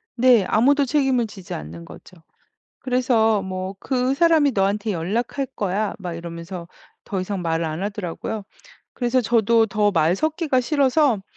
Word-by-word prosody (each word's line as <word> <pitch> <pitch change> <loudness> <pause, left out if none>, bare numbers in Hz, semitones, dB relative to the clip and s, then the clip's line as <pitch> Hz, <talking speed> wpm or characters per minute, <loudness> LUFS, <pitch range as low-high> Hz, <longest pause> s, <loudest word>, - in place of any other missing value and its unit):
네. 240 -5 +5
아무도 280 +5 +3
책임을 265 -4 +1
지지 190 -3 -9
않는 85 +3 -8
거죠. 180 - -14 0.6
그래서 235 -5 +2
뭐 185 0 -5
"그 260 0 0
사람이 315 -3 +4
너한테 200 +2 0
연락할 225 +10 -2
거야." 205 +1 -1
막 180 -3 -5
이러면서 170 +1 -7 0.4
더 190 -2 -3
이상 185 -1 -4
말을 165 0 -1
안 160 +2 -4
하더라고요. 200 +1 -4 0.5
그래서 250 0 +1
저도 230 -1 +3
더 210 0 +1
말 165 +2 +2
섞기가 315 - 0
싫어서 275 -4 +2
215 Hz, 305 characters per minute, -22 LUFS, 185-255 Hz, 0.6 s, 네